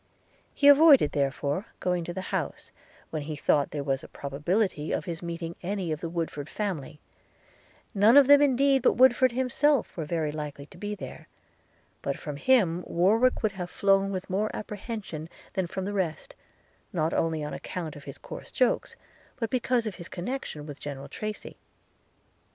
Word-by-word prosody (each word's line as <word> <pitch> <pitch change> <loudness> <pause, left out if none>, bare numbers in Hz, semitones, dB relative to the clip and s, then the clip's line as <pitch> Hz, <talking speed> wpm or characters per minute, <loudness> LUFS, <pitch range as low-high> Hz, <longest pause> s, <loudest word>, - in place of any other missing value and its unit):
He 285 - +4
avoided, 285 - +8
therefore, 140 +6 -1
going 180 -1 0
to 175 - -4
the 190 - -4
house, - - -3 0.4
when 155 - -2
he 150 +1 -5
thought 145 0 +2
there 145 -2 -4
was 135 -1 -1
a - - -9
probability 150 +4 -1
of - - -1
his 170 -2 -5
meeting 170 -1 -5
any 185 -2 -2
of 155 - -3
the 170 - -3
Woodford 160 -3 -4
family; 175 -8 -4 0.9
none 215 +5 +6
of 285 - +9
them 285 +1 +7
indeed 275 -1 +4
but 250 - +4
Woodford 255 0 +5
himself 260 +2 +1
were 165 - -3
very 155 -1 -1
likely 150 -2 -6
to - - -16
be 210 0 -3
there; - - -9 0.7
but - - -2
from 150 -3 -6
him 180 - +3
Warwick 220 +10 +3
would 215 - +2
have 180 -2 -6
flown 195 0 +2
with 185 -1 -4
more 200 +3 0
apprehension 205 -7 -6 0.2
than 190 -3 -1
from 190 +2 -4
the 205 - -3
rest, 190 - -3 0.6
not 165 -4 0
only 160 -2 0
on 150 - -4
account 165 -4 -5
of 145 - -12
his 140 - -8
coarse - - -9
jokes, 255 - +1 0.4
but 230 -4 -3
because 250 -2 +1
of 215 - -3
his 170 -3 -8
connection 180 - -5
with 145 -2 -9
General 140 -1 -7
Tracy. 215 +7 -6
180 Hz, 175 wpm, -27 LUFS, 155-225 Hz, 0.9 s, of